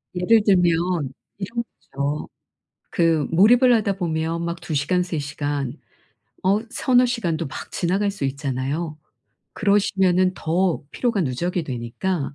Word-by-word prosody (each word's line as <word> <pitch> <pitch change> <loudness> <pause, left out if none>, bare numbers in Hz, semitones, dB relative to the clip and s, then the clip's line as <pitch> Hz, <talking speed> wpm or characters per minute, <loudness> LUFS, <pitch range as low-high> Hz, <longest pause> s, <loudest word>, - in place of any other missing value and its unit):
예를 205 +5 +4
들면 175 -6 +2 0.2
이런 230 +4 -3 0.3
거죠. 140 +2 -2 0.7
그 165 -4 +2
몰입을 240 +8 +6
하다 200 -3 +1
보면 165 -1 -2
막 170 0 -4
2 155 - -5
시간 180 +6 +1
3 175 -3 -3
시간 145 -2 -3 0.6
어 195 +3 +3
3-4 250 -1 +3
시간도 170 - -1
막 135 - -8
지나갈 195 +3 0
수 195 -8 -5
있잖아요. 140 +3 -3 0.6
그러시면은 190 -2 +2
더 175 +1 0
피로가 235 -5 0
누적이 170 +6 -2
되니까 135 +6 -3
175 Hz, 240 characters per minute, -23 LUFS, 150-195 Hz, 0.7 s, 몰입을